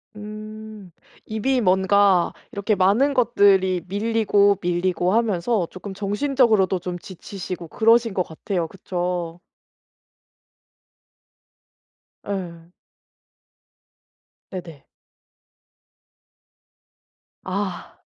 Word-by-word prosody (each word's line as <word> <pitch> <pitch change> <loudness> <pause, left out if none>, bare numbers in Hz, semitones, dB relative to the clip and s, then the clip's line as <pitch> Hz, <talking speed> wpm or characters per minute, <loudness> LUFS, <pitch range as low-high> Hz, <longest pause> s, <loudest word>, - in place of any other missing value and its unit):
음. 215 -1 -9 0.3
이미 245 +4 0
뭔가 190 -1 +3 0.2
이렇게 205 +1 0
많은 205 +10 +3
것들이 195 - +3
밀리고, 205 -1 +2
밀리고 180 +1 0
하면서 215 -3 +1
조금 195 +1 -8
정신적으로도 210 -1 +2
좀 175 0 -5
지치시고 185 -1 -7
그러신 230 +2 +3
것 185 - +1
같아요. 170 +1 -3
그쵸? 175 -1 -4 2.9
예. 175 -4 -5 1.8
네네. 170 -6 -9 2.6
아. 190 0 -4
195 Hz, 160 characters per minute, -23 LUFS, 180-215 Hz, 2.9 s, 뭔가